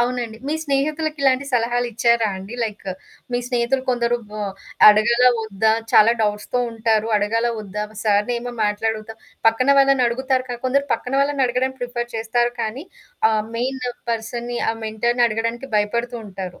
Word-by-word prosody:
అవునండి. 240 -2 -1
మీ 300 - 0
స్నేహితులకి 300 +2 -1
ఇలాంటి 265 0 +3
సలహాలిచ్చారా 235 -1 +2
అండి? 195 +5 -8
లైక్ 210 -2 -6 0.5
మీ 245 - +1
స్నేహితులు 245 +1 0
కొందరు 240 -1 +1
బ - - -14 0.6
అడగాలా 235 +4 +5 0.2
ఒద్దా? 220 +1 +1 0.2
చాలా 220 +2 +7
డౌట్స్‌తో 210 +3 -1
ఉంటారు. 220 -1 +1
అడగాలా 225 +3 +1
వద్దా? 210 0 -4 0.2
సార్‌నేమో 235 +4 0
మాట్లాడుగుతా, 215 +1 -2 0.3
పక్కన 225 +4 +3
వాళ్ళని 275 -2 +4
అడుగుతారు 260 +2 0
కా 245 - -3
కొందరు 280 +2 +1
పక్కన 250 - -3
వాళ్ళని 280 -1 +2
అడగడం 250 +2 0
ప్రిఫర్ 240 -1 -4
చేస్తారు 240 +2 0
కానీ 230 +8 -3 0.5
ఆహ్, 215 -1 +1
మెయిన్ 260 +2 -2 0.3
పర్సన్‌ని 235 +1 -3
ఆ - - -1
మెంటర్‌ని 235 +3 +1
అడగడానికి 230 +3 -2
భయపడుతూ 235 +4 -1
ఉంటారు. 185 -2 -7
235 Hz, 140 wpm, -21 LUFS, 220-250 Hz, 0.6 s, చాలా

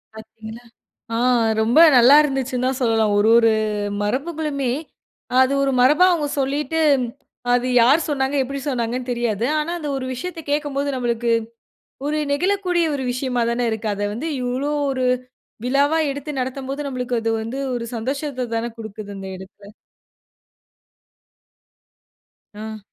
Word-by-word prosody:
பார்த்தீங்களா? 220 +1 -11 0.5
ஆ - - 0 0.4
ரொம்ப 235 +8 +4 0.2
நல்லா 245 +4 +8
இருந்துச்சுன்னு 265 -3 -1
தான் 265 0 -3
சொல்லலாம். 225 -3 +2
ஒரு 210 - +3
ஒரு 230 -1 +4 0.5
மரபுகளுமே, 280 +2 -2 0.7
அது 260 +1 +4
ஒரு 270 -1 +1
மரபா 295 +8 +5
அவங்க 300 -4 -1
சொல்லிட்டு 290 +4 -1 0.7
அது 245 0 +2 0.2
யார் 275 +7 +5
சொன்னாங்க? 275 -1 -1
எப்டி 275 +2 -5
சொன்னாங்கன்னு 245 0 -2
தெரியாது. 235 -2 -1
ஆனா 305 +3 -2
அந்த 305 -3 -5
ஒரு 260 -1 -4
விஷயத்த 335 +6 -6
கேக்கும்போது 290 -1 -1
நம்மளுக்கு, 240 -1 -1 0.8
ஒரு 305 +1 0
நெகிழக்கூடிய 360 +1 +1
ஒரு 265 - -4
விஷயமா 250 -1 -1
தானே 240 +1 -1
இருக்கு. 220 0 -3
அத 205 - -5
வந்து 280 +9 -4
இவ்ளோ 255 +4 -2 0.2
ஒரு 260 -1 -1 0.6
விழாவா 280 +5 +2
எடுத்து 285 +2 -6
நடத்தம்போது, 270 +2 -4
நம்மளுக்கு 250 -2 -3
அது 225 0 -1
வந்து 240 +5 -5 0.2
ஒரு 235 -1 -3
சந்தோஷத்த 260 +1 -3
தானே 235 +1 -2
குடுக்குது 215 -2 -8
அந்த 195 0 -7
எடத்துல. 200 +2 -14 2.8
ஆ. 220 0 -7
255 Hz, 130 wpm, -21 LUFS, 230-285 Hz, 2.8 s, நல்லா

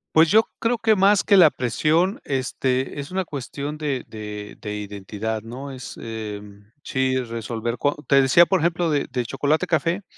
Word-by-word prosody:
Pues, 160 0 +6
yo 220 +3 +5
creo 230 +1 +1
que 220 -1 +3
más 195 +1 +4
que 200 - +5
la 165 -4 +8
presión, 160 - 0
este, 130 0 -1
es 140 - -6
una 185 0 -2
cuestión 145 +1 -6
de 140 -5 -2
de 105 -1 -8
de 105 -1 -4
identidad, 105 +2 -5
¿no?, 130 +5 -8
es, 130 -1 -9
em 105 -2 -8
sí, 130 -1 0
resolver 115 -1 -4
co 145 - +1
te 140 -1 +5
decía, 135 +6 +6
por 190 +1 +1
ejemplo, 170 0 +1
de 145 -2 0
del 125 -2 -2
chocolate 145 +7 0
café, 170 +4 0
135 Hz, 175 wpm, -23 LUFS, 115-165 Hz, -, la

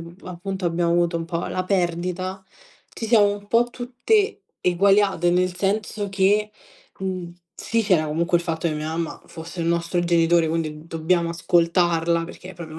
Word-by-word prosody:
mhmm, 170 +1 -11
appunto 185 +1 -5
abbiamo 170 0 +1
avuto 170 0 +2
un 165 - -5
po' 170 0 -3
la 185 - -2
perdita, 185 0 -1 0.5
ci - - -5
siamo 215 -3 +5
un 205 0 -14
po' 230 +2 +4
tutte 250 - 0 0.2
eguagliate, 195 -1 +3
nel 180 0 +1
senso 205 +2 -1
che, 200 +2 +2 0.5
mhmm, 185 -2 -4 0.2
sì, 230 0 -1
c'era 180 -7 +2
comunque 170 +3 +1
il - - -6
fatto 165 -1 -2
che 165 - 0
mia 150 0 -4
mamma 165 +1 -4
fosse 165 +2 -8
il 165 - -1
nostro 170 +1 0
genitore, 170 -1 +3
quindi 155 -1 -3
dobbiamo 170 +1 0
ascoltarla 170 0 +2
perché 180 +2 -10
è - - -16
proprio 160 -2 -9
175 Hz, 170 wpm, -23 LUFS, 170-195 Hz, 0.5 s, siamo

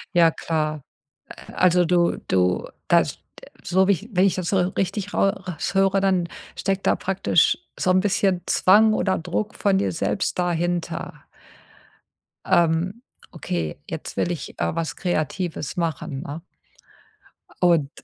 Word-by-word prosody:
Ja, 165 -2 +6
klar. 155 -2 -2 0.5
Äh, - - -12
also, 180 -1 +3
du 175 0 +2
du 90 -1 +1 0.2
das - - +3 0.2
d - - -15 0.2
so 190 +1 +2
wie - - +5
ich 200 +6 -7
wenn 185 -1 +3
ich 195 - +2
das 180 -3 -3
so 195 - +2 0.2
richtig 195 +1 -2
rau 195 - +3
raus 185 -2 -5
höre, 195 0 +3
dann 185 -3 +1 0.3
steckt 195 0 -2
da - - +4
praktisch 195 0 +2 0.2
so 185 - +2
'n 185 - +4
bisschen 190 -2 +1
Zwang 215 +4 +5
oder 190 -3 +1
Druck 185 +5 -3
von 195 -2 +2
dir 195 - 0
selbst 175 +3 -1
dahinter. 175 0 -2 1.2
„Ähm, 175 +6 +2 0.3
okay, 85 - -4
jetzt - - -6
will 175 - 0
ich, 170 - -6
äh, - - -1
was 165 -3 -3
Kreatives 175 -1 -3
machen“, 160 -5 -3
ne? 145 +4 -7 1.2
Und 170 -6 +3
180 Hz, 145 wpm, -23 LUFS, 165-195 Hz, 1.2 s, Ja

